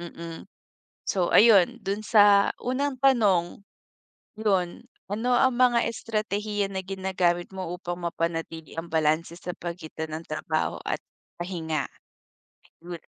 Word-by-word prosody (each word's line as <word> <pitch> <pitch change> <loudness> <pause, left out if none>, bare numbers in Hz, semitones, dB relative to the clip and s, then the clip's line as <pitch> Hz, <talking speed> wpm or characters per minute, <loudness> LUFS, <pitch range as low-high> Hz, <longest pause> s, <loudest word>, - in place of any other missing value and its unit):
mm. 165 0 -7 0.7
So 180 -3 +1
ayun, 205 -5 +6
dun 200 +2 -2
sa 205 -2 +6
unang 260 +1 -2
tanong. 200 -9 +3 0.8
Yun, 190 -1 0 0.2
ano 225 +5 -1
ang 260 -2 +4
mga 245 -2 +4
estratehiya 210 -2 -2
na 190 - -2
ginagamit 185 -2 0
mo 185 -3 -4
upang 175 -1 -5
mapanatili 165 -1 -4
ang 165 +1 -5
balanse 160 +1 +1
sa 180 -1 -6
pagitan 160 -2 -6
ng 160 +1 -5
trabaho 155 +1 -2
at - - -2 0.4
pahinga? 165 -4 -3 0.9
Good. 170 -2 -8
185 Hz, 120 wpm, -26 LUFS, 170-210 Hz, 0.9 s, ayun